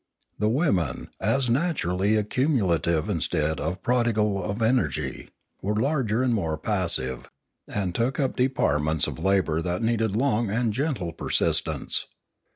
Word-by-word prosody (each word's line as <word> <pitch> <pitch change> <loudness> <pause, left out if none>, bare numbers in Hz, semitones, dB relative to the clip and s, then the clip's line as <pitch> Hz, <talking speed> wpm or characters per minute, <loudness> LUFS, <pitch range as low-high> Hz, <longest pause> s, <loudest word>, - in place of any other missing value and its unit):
The 105 +1 +2
women, 105 - 0
as 125 +5 +1
naturally 110 - +1
ac 105 0 -1
cumulative 95 - +1
instead 80 -5 -1
of 90 +1 -3
prodigal 110 -5 +1
of 100 +4 -3
energy, 110 - 0 0.3
were 105 +3 -1
larger 125 -1 +1
and 125 -2 +2
more 80 -8 -1
passive, 80 - -1 0.4
and 95 -4 -2
took 120 - -1
up 135 -2 0
departments 80 - +1
of - - -5
labour 85 -3 +1
that 90 +5 -2
needed 115 -2 +1
long 120 -3 +1
and 115 +1 0
gentle 125 - -2
persistence. - - 0
105 Hz, 135 wpm, -25 LUFS, 85-120 Hz, 0.4 s, The